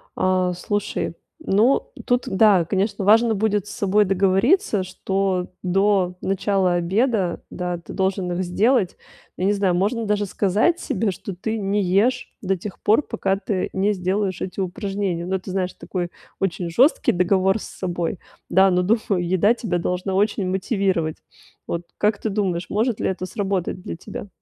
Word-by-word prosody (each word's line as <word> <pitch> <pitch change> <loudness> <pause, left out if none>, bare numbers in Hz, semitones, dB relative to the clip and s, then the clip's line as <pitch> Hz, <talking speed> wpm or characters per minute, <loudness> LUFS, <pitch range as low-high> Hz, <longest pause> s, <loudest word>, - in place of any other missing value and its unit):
А 185 -1 +1
слушай, 205 +3 -2 0.2
ну, 275 - +2 0.2
тут 245 -1 +2
да, 190 -3 +4
конечно, 195 +3 -1
важно 225 +2 +5
будет 210 -1 0
с - - -7
собой 205 +1 +2
договориться, 195 - +2
что 185 0 -1
до 185 -1 +2
начала 195 -1 +1
обеда, 190 +1 0
да, 180 -1 -3
ты 170 - -10
должен 190 -1 -1
их 180 +2 -1
сделать. 205 +2 +1 0.4
Я 185 - -1
не 200 - +3
знаю, 195 -3 +1
можно 215 +5 0
даже 205 0 +1
сказать 205 - +1
себе, 215 -4 -1
что 185 +1 -7
ты 220 +5 -3
не 200 0 0
ешь 210 +8 +1
до 195 -1 0
тех 190 +1 -8
пор, 220 +8 +3
пока 195 -6 -1
ты 195 -1 -2
не 200 +2 +1
сделаешь 185 0 -1
эти 185 - -5
упражнения. 195 -2 -2
Ну, 190 +1 0
ты 185 - -8
знаешь, 185 -1 -1
такой 175 -2 -4 0.3
очень 180 -2 -1
жёсткий 260 - +4
договор 190 +3 +2
с - - -7
собой. 175 -1 -3 0.3
Да, 190 +1 +5
но, 180 0 +3
думаю, 205 -2 +1
еда 185 +5 +3
тебя 215 -7 -2
должна 180 +2 -2
очень 200 -1 +1
мотивировать. 190 - 0 0.5
Вот 170 0 -3 0.2
как 210 0 +2
ты 220 - -1
думаешь, 185 -4 -1
может 220 +2 0
ли - - 0
это 185 -1 -3
сработать 195 -3 -2
для - - -5
тебя? 200 - -8
195 Hz, 165 wpm, -22 LUFS, 185-210 Hz, 0.5 s, важно